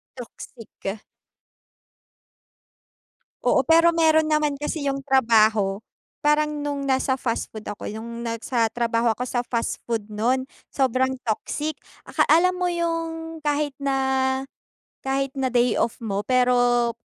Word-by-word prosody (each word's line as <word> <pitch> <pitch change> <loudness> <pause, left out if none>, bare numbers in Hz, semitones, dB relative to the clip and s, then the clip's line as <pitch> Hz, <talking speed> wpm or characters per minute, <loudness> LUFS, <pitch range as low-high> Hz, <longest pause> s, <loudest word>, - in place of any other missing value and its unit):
Toxic. 225 -4 -8 2.4
Oo, - - +4
pero 335 +1 +5
meron 315 -1 +4
naman 305 -2 +1
kasi 295 +2 -3
yung 275 0 -4
trabaho, 220 -6 +3 0.5
parang 300 0 +3 0.2
nung 285 -1 -2
nasa 265 0 +2
fast 245 -3 -2
food 215 -1 -8
ako 205 - -7
nung 235 +2 -7
nasa 230 +1 0
trabaho 230 -1 +1
ako 245 +3 -4
sa 245 - 0
fast 235 -1 -2
food 225 -3 -3
nun, 250 +5 0 0.2
sobrang 260 0 +1
toxic. 295 +7 -3 0.3
Aka - - +2
alam 365 +3 +4
mo 360 - -1
yung 330 -2 -2
kahit 290 -1 0
na, 275 -1 -1 1.1
kahit 270 0 -1
na 265 -2 -1
day 245 -1 +2
off 230 - 0
mo 205 -3 -3
pero, 245 0 +3
260 Hz, 125 wpm, -24 LUFS, 230-300 Hz, 2.4 s, pero